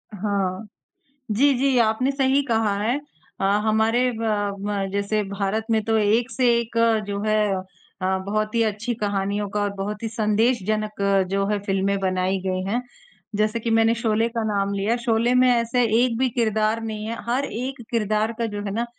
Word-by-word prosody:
हाँ। 200 0 -2 0.6
जी, 275 +6 +4
जी, 265 0 +2
आपने 230 +4 +2
सही 270 0 +2
कहा 225 -4 +1
है। 235 +5 +1 0.4
अ, - - 0 0.2
हमारे 225 +3 +2
ब 205 -3 -1
म 200 -2 -1
जैसे 200 +1 0
भारत 200 +2 -2
में 220 -1 +2
तो 225 0 +2
एक 220 +4 +2
से 255 -2 +1
एक 230 0 -5 0.3
जो 200 0 -3
है 215 0 +2 0.6
अ, 190 +1 +1
बहुत 215 +2 -1
ही 230 - +3
अच्छी 220 +3 -2
कहानियों 205 -1 -1
का 210 - -2
और 205 - 0
बहुत 210 +3 -5
ही - - -1
संदेशजनक 215 -1 0 0.3
जो 195 0 +1
है 210 0 0
फ़िल्में 195 0 +1
बनाई 185 0 0
गई 185 0 -1
हैं। 225 +6 -1 0.5
जैसे 215 +2 +1
कि 230 - -3
मैंने 225 0 +4
शोले 225 0 +1
का 230 -1 -2
नाम 200 -2 0
लिया, 200 +4 0
शोले 235 0 +1
में 255 0 +5
ऐसा 235 0 +1
एक 230 +1 +2
भी 260 0 +2
किरदार 220 -1 0
नहीं 215 -1 -4
है 230 +1 -4
हर 265 +3 +1
एक 255 +2 -5
किरदार 215 -1 +1
का 230 - +1
जो 205 0 -4
है 200 - -3
ना, 235 +2 -1
215 Hz, 185 wpm, -23 LUFS, 205-235 Hz, 0.6 s, में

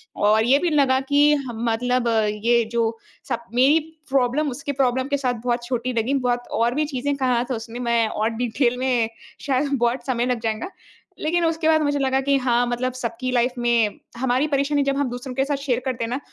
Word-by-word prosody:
और 215 +2 +3
ये 270 +4 +4
भी 350 - 0
लगा 270 -3 +3
कि 285 - +5
ह 275 -4 -4
मतलब 240 +2 0 0.4
ये 235 0 +4
जो 230 -1 0 0.3
सब 235 - -2
मेरी 275 +6 +5 0.3
प्रॉब्लम 270 +3 +1
उसकी 280 +3 -4
प्रॉब्लम 260 -1 +1
के 285 - +1
साथ 255 -3 0
बहुत 240 -1 0
छोटी 245 0 -2
लगी। 230 +4 0
बहुत 245 -2 0
और 240 +2 +2
भी 305 +1 +1
चीज़ें 285 0 -2
कहा 250 -3 +1
था 250 - 0
उसने 230 +2 -7
मैं 235 -2 +1
और 215 +1 -1
डिटेल 245 +1 +1
में 245 -4 +1 0.3
शायद 280 +1 0
बहुत 240 -1 0
समय 245 -2 0
लग 250 -2 0
जाएगा। 220 +7 -2 0.5
लेकिन 335 +2 +1
उसके 325 0 0
बाद 315 -1 +4
मुझे 285 -1 0
लगा 265 0 +1
कि 280 0 +2
हाँ, 245 -2 +2
मतलब 250 +1 -2
सबकी 250 0 -4
लाइफ़ 245 0 +1
में 235 -3 +1 0.2
हमारी 260 +3 +1
परेशानी 285 0 +1
जब 275 0 0
हम 280 -2 0
दूसरों 245 +1 -6
के 270 +1 +1
साथ 285 0 -1
शेयर 270 -3 -1
करते 255 -3 -2
हैं - - -5
ना, 255 - -1
255 Hz, 210 wpm, -22 LUFS, 240-275 Hz, 0.5 s, कि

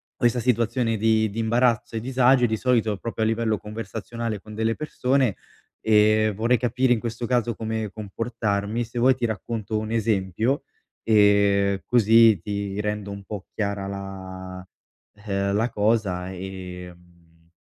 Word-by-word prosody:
questa 120 0 +1
situazione 115 -1 +1
di 110 0 +2
di 100 - -9
imbarazzo 115 0 +1
e - - -1
disagio, 125 +1 +3
e - - +2
di 110 0 -1
solito 115 -4 +1
proprio 115 +1 -3
a - - +2
livello 110 -1 0
conversazionale 110 +1 -5
con 105 +2 -11
delle 110 +1 0
persone, 130 -6 0 0.5
ehm, 110 0 +4
vorrei 115 +5 +2
capire 125 +2 +2
in 115 - -1
questo 120 +1 -4
caso 120 -1 +1
come 110 -2 -3
comportarmi. 110 +1 -2
Se 115 +2 -10
vuoi 130 +2 +5
ti 125 - -2
racconto 110 0 -3
un 110 0 -4
esempio, 110 +3 0 0.4
ehm, 100 -2 +3
così 115 -3 +5
ti 100 0 -4
rendo 105 -1 -3
un 100 0 -8
po' 100 -1 -7
chiara 100 -2 -2
la, 95 -1 -7 0.6
eh, 100 0 0
la 110 +4 +1
cosa 100 -5 0
e, 90 -1 -7
mhmm, 85 -1 -26
110 Hz, 150 wpm, -24 LUFS, 100-115 Hz, 0.6 s, vuoi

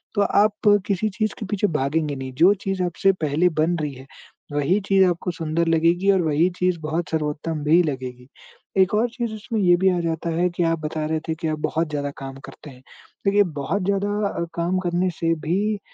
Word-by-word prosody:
तो 205 - +2
आप 210 +1 +3 0.2
किसी 210 +2 0
चीज़ 215 +1 -2
के 215 - -4
पीछे 205 +1 0
भागेंगे 145 +2 -1
नहीं, 130 -1 -6
जो 175 +9 +5
चीज़ 195 -1 -1
आपसे 180 +2 +2
पहले 155 +5 +2
बन 175 +2 +2
रही 145 -2 -3
है, 130 +1 -12 0.5
वही 145 +8 +2
चीज़ 195 -1 +5
आपको 175 +1 -2
सुंदर 165 0 -1
लगेगी 170 +4 +3
और 190 -2 +3
वही 160 +3 +2
चीज़ 180 -2 +1
बहुत 155 0 -3
सर्वोत्तम 155 0 -2
भी 160 +4 +5
लगेगी। 130 -3 -5 0.5
एक 185 +2 +2
और 235 +3 +2
चीज़ 235 -2 -4
इसमें 220 +1 -4
ये 175 -2 +5
भी 190 +2 +3
आ - - 0
जाता 165 0 -2
है 175 +2 +1
कि 175 0 -1
आप 165 -1 +1
बता 155 0 -3
रहे 160 0 -1
थे 160 - 0
कि 165 0 -4
आप 155 -1 -2
बहुत 165 +1 -1
ज़्यादा 145 -1 -3
काम 135 0 -7
करते 150 - -12
हैं, 125 0 -16 0.4
देखिए, 205 +1 +4
बहुत 160 +3 -3
ज़्यादा 200 +1 0 0.2
अ, 170 - -3
काम 170 +2 0
करने 180 0 0
से 165 0 +2
भी 205 +4 0
170 Hz, 210 wpm, -23 LUFS, 155-195 Hz, 0.5 s, जो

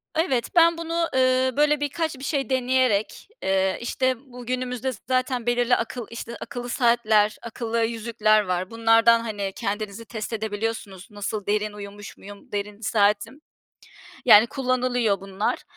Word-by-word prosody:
evet, 290 -8 0
ben 335 0 +5
bunu, 335 0 -1
eee, 260 0 +3
böyle, 300 0 +3
birkaç 310 +1 -2
bir - - -10
şey 275 -2 -1
deneyerek, 255 - +1 0.2
eee, 190 0 +1
işte 260 +2 0 0.2
bu 245 -1 -10
günümüzde 255 +1 -2
z 215 - -12
zaten 255 -2 0
belirli 245 0 +2
akıl 230 0 -4
işte, 230 0 -7
akıllı 245 0 -6
saatler, 220 -4 +2
akıllı 230 0 -2
yüzükler 220 -2 +2
var. 185 -1 -2
Bunlardan, 230 0 +5
hani, 205 -4 -4
kendinizi 210 +2 -4
test 220 +1 -6
edebiliyorsunuz. 210 -3 -4
Nasıl 205 0 -4
derin 210 0 0
uyumuş 205 0 -10
muyum, 200 0 -13
derin 205 0 -4
saatim. 210 +7 +1 0.8
Yani, 225 -1 +8
kullanılıyor 250 -6 0
bunlar. 195 +1 -2
230 Hz, 140 wpm, -24 LUFS, 210-255 Hz, 0.8 s, Yani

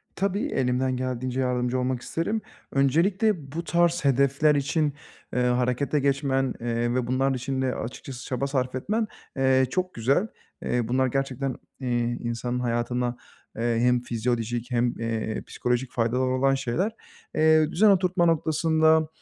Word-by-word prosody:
Tabii, 200 +5 0
elimden 130 - 0
geldiğince 130 0 -2
yardımcı 125 0 0
olmak 125 -1 -1
isterim. 205 +11 -2 0.3
Öncelikle 165 - +2
bu 165 +3 -4
tarz 170 -1 +1
hedefler 140 +3 +3
için, 145 +1 0 0.4
eee, 125 - +1
harekete 125 +3 +1
geçmen, 135 -2 +1
eee, 120 0 -1
ve 125 -2 0
bunların 135 +2 +1
için 130 +1 -2
de 130 -1 0
açıkçası 125 +2 -7
çaba 135 +1 -2
sarf 130 -2 -1
etmen, 215 - -1 0.3
eee, 130 0 +4
çok 185 +6 -2
güzel. 135 - +1 0.4
Eee, 120 -2 0
bunlar 130 +2 +2
gerçekten, 135 0 -2 0.2
iii, 120 -2 -1
insanın 120 +1 -2
hayatına, 120 0 -1 0.4
eee, 115 0 0
hem 125 +1 +3
fizyolojik 120 0 -2
hem, 120 0 +1
eee, 115 -1 -2
psikolojik 125 +1 -1
faydaları 125 +2 0
olan 135 +1 +2
şeyler. 140 - -1 0.4
Eee, 155 0 +4
düzen 210 +5 +5
oturtma 185 -2 +3
noktasında, 160 -1 +3
130 Hz, 140 wpm, -26 LUFS, 125-155 Hz, 0.4 s, düzen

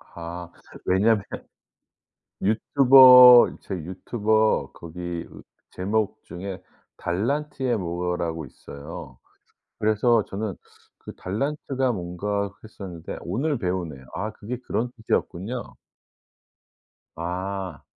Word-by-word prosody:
아. 85 +1 -7 0.4
왜냐하면 100 +3 +3 1.2
유튜버 125 +2 +8
제 95 - -5
유튜버 105 +5 0
거기 85 0 -6 0.4
제목 105 +3 -2
중에 95 +2 -7 0.3
달란트의 130 +6 -1
뭐라고 85 -3 -3
있어요. 70 0 -10 0.6
그래서 110 +1 +3
저는 100 0 -4 0.4
그 - - -10
달란트가 135 +4 -2
뭔가 100 +2 -3
했었는데 95 -6 -8
오늘 130 - -1
배우네요. 90 - -3
아 105 +6 -3
그게 110 +3 -6
그런 120 +2 -1
뜻이었군요. 110 +1 -3 1.4
아. 90 0 -4
100 Hz, 205 characters per minute, -24 LUFS, 85-115 Hz, 1.4 s, 유튜버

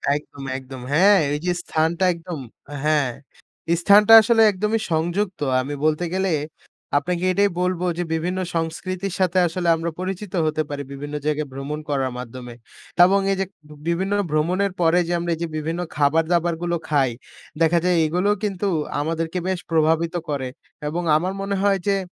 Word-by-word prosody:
একদম, 145 -1 -8
একদম 130 -1 -9
হ্যাঁ। 195 +5 +6
এই 150 - -1
যে 180 - +2
স্থানটা 165 +3 0
একদম 170 -2 -7 0.4
হ্যাঁ 150 -4 +2 0.7
স্থানটা 205 +4 +6
আসলে 225 0 +3
একদমই 210 +4 -1
সংযুক্ত। 175 +4 -1 0.2
আমি 140 +3 -5
বলতে 155 +3 +1
গেলে 190 -1 0 0.7
আপনাকে 175 +4 -1
এটাই 200 +2 +3
বলব 180 -1 0 0.2
যে, 175 - 0
বিভিন্ন 175 +3 -1 0.2
সংস্কৃতির 180 +3 -3
সাথে 185 -1 +1
আসলে 175 +1 -3
আমরা 165 +1 -3
পরিচিত 185 +1 -5
হতে 155 0 0
পারি 145 -1 -4
বিভিন্ন 145 +2 -6
জায়গায় 150 0 0
ভ্রমণ 140 +3 -5
করার 135 -3 0
মাধ্যমে। 125 0 -8 0.5
এবং 195 +2 +3
এই 195 - 0
যে 195 - +1 0.4
বিভিন্ন 190 +4 0 0.2
ভ্রমণের 180 +6 +1
পরে 165 +1 +4
যে 175 - -1
আমরা 170 0 -2
এই - - -13
যে, - - -1
বিভিন্ন 165 +3 -3 0.2
খাবার-দাবারগুলো 165 +3 +1
খাই, 140 -4 +3 0.5
দেখা 165 +1 +4
যায় 180 -1 +3
এগুলোও 180 +6 +1
কিন্তু 200 -1 -1 0.3
আমাদেরকে 165 +3 -2
বেশ 185 -2 -1
প্রভাবিত 165 +2 +2
করে 140 -3 -2 0.4
এবং 170 +4 -2
আমার 180 +5 0
মনে 200 0 -2
হয় 200 -1 +3
যে 195 -1 +2
170 Hz, 155 wpm, -22 LUFS, 155-185 Hz, 0.7 s, হ্যাঁ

